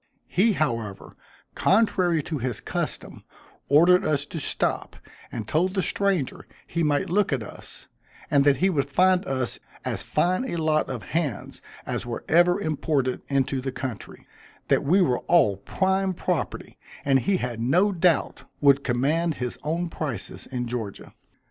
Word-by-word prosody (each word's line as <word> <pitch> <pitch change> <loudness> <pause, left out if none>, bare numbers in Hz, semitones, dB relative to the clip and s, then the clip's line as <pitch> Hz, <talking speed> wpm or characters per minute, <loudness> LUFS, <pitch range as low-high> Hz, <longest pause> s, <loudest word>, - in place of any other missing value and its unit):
He, 215 +4 +3
however, 115 - -3 0.4
contrary 185 -6 +2
to 155 -1 -4
his 125 -2 -3
custom, - - -5 0.5
ordered 175 +6 +6
us 145 -2 0
to 160 - -6
stop, - - -2 0.4
and 110 -2 -5
told 180 - +1
the 190 - +1
stranger 195 -9 -1 0.2
he 170 - -2
might 150 +4 +1
look 200 -1 +2
at 130 -5 0
us, - - -11 0.5
and 140 -1 +5
that 140 -1 +5
he 190 - +3
would 140 -4 0
find 185 +4 +3
us 130 -2 -2 0.3
as - - -2
fine 185 +6 +1
a - - -3
lot 155 -2 +1
of 125 -5 -5
hands 150 -10 -2 0.2
as - - -3
were 120 -1 -5
ever 175 +3 +4
imported 145 -6 -1
into 135 -1 0
the 135 0 -3
country 125 -4 -7 0.4
that - - +3
we 185 +7 +4
were 125 -7 +1
all 105 - +4
prime 190 - 0
property, - - -3 0.3
and 135 -1 +4
he 195 +8 +1
had 125 -7 -4
no 170 - +3
doubt 175 -3 +1
would 140 -1 +4
command 150 +7 +1
his 125 -1 -4
own 165 +3 -1
prices 140 - -5
in 125 -2 -3
Georgia. 115 -4 -6
150 Hz, 155 wpm, -25 LUFS, 130-180 Hz, 0.5 s, ordered